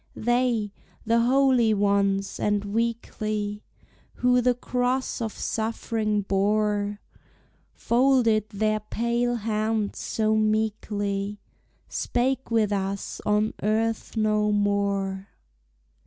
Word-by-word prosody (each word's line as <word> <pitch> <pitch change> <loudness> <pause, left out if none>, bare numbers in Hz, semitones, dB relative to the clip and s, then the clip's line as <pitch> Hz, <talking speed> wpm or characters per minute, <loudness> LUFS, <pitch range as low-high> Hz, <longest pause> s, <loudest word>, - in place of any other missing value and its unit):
They, 240 -3 0 0.3
the 230 +1 +3
holy 250 -2 +3
ones 200 -1 +1
and 205 -1 0
weakly, 215 -1 -2 0.5
Who 250 0 +3
the 250 0 +2
cross 250 +1 -1
of 220 -1 -2
suffering 220 -1 -2
bore, 205 +1 0 0.7
Folded 235 -4 +2
their 215 +1 0
pale 235 +3 -1
hands 215 -1 -1
so 220 -1 0
meekly, 210 -2 -1 0.5
Spake 260 +2 -1
with 220 -3 +2
us 195 0 -3
on 210 +1 +2
earth 225 +2 -1
no 215 -1 +2
more! 200 -1 0
215 Hz, 95 wpm, -25 LUFS, 205-235 Hz, 0.7 s, the